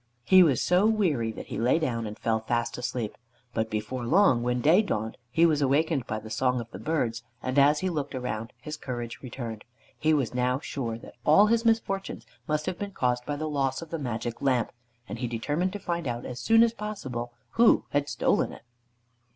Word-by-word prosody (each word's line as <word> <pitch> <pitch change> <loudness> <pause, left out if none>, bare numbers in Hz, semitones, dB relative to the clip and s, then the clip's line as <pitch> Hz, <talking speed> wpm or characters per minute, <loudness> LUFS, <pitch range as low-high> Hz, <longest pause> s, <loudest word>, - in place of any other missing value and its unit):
He 185 +9 +7
was 145 -9 +4
so 180 +4 +4
weary 165 - +1
that - - -8
he - - -4
lay 120 +6 +3
down 120 -8 -1
and 105 +1 -7
fell 110 -1 0
fast 120 +1 -1
asleep; 120 -3 -3 0.4
but 110 0 -1
before 110 +4 -3
long, 135 -6 +4
when 125 +1 0
day 160 - +5
dawned, 110 - -2
he 165 +7 +4
was 155 -3 +3
awakened 140 0 +1
by 110 - -2
the 110 0 -9
song 125 +3 +1
of 115 -1 -8
the - - -8
birds, 125 -8 -1 0.2
and 130 +2 +1
as 145 +3 +5
he 185 - 0
looked 145 -4 -3
around 115 -3 -4
his 150 +4 -6
courage 120 -4 -5
returned. 120 -4 -6 0.4
He 155 +1 +2
was 135 -6 -1
now 125 +1 +1
sure 120 -6 -4
that - - -13
all 155 - +6
his 230 +2 +2
misfortunes 210 -4 0 0.2
must 150 0 0
have 185 -1 -3
been 200 -1 -5
caused 125 -4 0
by 145 - -1
the 155 +2 -3
loss 135 -1 -1
of 165 - -13
the 165 - -3
Magic 120 -3 -4
Lamp, 125 -5 +1 0.4
and 105 +3 -6
he 125 - -1
determined 145 +11 -1
to 205 - -4
find 170 -4 -3
out 120 0 -3
as 125 0 -6
soon 225 - +5
as 235 -1 +2
possible 130 - -5 0.2
who 230 0 +4
had 145 0 0
stolen - - +1
it. - - -12
130 Hz, 210 wpm, -27 LUFS, 120-165 Hz, 0.4 s, He